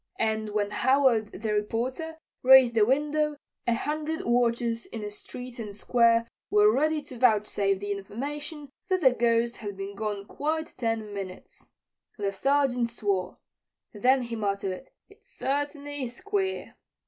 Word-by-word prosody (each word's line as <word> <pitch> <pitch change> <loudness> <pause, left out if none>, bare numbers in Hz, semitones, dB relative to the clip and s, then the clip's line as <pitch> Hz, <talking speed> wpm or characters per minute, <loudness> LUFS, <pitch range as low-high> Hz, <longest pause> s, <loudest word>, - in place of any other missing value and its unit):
And 220 -1 0
when 205 -1 -1
Howard, 260 -1 +3
the 215 +2 -3
reporter, 250 +10 -2 0.2
raised 255 -2 +7
a 220 - +5
window, 300 +3 +1 0.3
a 235 - +3
hundred 305 +4 -3
watchers 235 -1 +1
in 225 - -6
the 210 - -4
street 245 +3 -8
and 210 -3 -6
Square 230 +1 +3 0.2
were 210 +1 +5
ready 305 +3 +1
to 250 -3 -10
vouchsafe 210 -4 +2
the 205 +1 -4
information 285 +9 -5 0.2
that 370 -1 +2
the 260 -4 +6
Ghost 235 0 +1
had 205 -3 -6
been 195 +1 -6
gone 205 -1 -3
quite 315 +7 -3
ten 225 -3 -2
minutes. 190 -2 -8 0.5
The 200 -2 -1
Sergeant 255 +1 +1
swore. 200 -6 -2 0.6
Then 255 +4 +3
he 235 -1 -5
muttered: 200 +1 -3 0.2
"It 410 +2 -21
certainly 290 0 -3
is 245 +6 -7
queer." 390 -1 -2
235 Hz, 145 wpm, -27 LUFS, 210-285 Hz, 0.6 s, raised